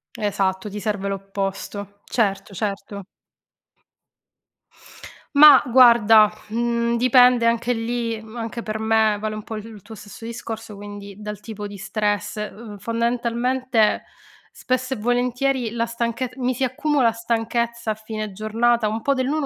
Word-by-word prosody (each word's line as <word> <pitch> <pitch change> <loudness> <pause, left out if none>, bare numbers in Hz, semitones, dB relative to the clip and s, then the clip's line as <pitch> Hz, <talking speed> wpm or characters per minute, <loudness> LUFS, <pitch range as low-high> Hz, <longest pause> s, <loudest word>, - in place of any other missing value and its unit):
Esatto, 195 -1 -1
ti 205 +1 -6
serve 205 -1 -2
l'opposto. 195 +1 -5
Certo, 205 -3 -1
certo. 200 0 -4 2.3
Mah 295 -2 +9
guarda, 230 -4 +6 0.2
mhmm, 235 +1 0
dipende 250 -1 +5
anche 235 +1 +1
lì, 230 -1 -3
mhmm, 220 +1 -13
anche 230 0 -5
per 215 -1 -4
me 220 -1 +2
vale 215 0 -3
un 215 - -5
po' 220 - -7
il 215 0 -7
il 220 -3 -11
tuo 220 +3 -11
stesso 210 +2 -11
discorso, 225 -2 -7
quindi 205 0 -9
dal 210 -1 -6
tipo 210 -1 -7
di 205 0 -7
stress. 205 +1 -2
Uhm, 210 0 -7
fondamentalmente, 235 +1 0 0.5
spesso 255 +1 -2
e - - -5
volentieri 245 +2 0
la 230 0 -1
stanchez 235 +2 -3
mi 255 -1 -1
si 260 +2 -2
accumula 260 -1 +1
stanchezza 230 0 -2
a - - -2
fine 215 -1 -6
giornata 220 +3 +1
un 220 +2 -3
po' 280 +4 +1
dell'uno 275 +3 -1
225 Hz, 140 wpm, -22 LUFS, 210-240 Hz, 2.3 s, Mah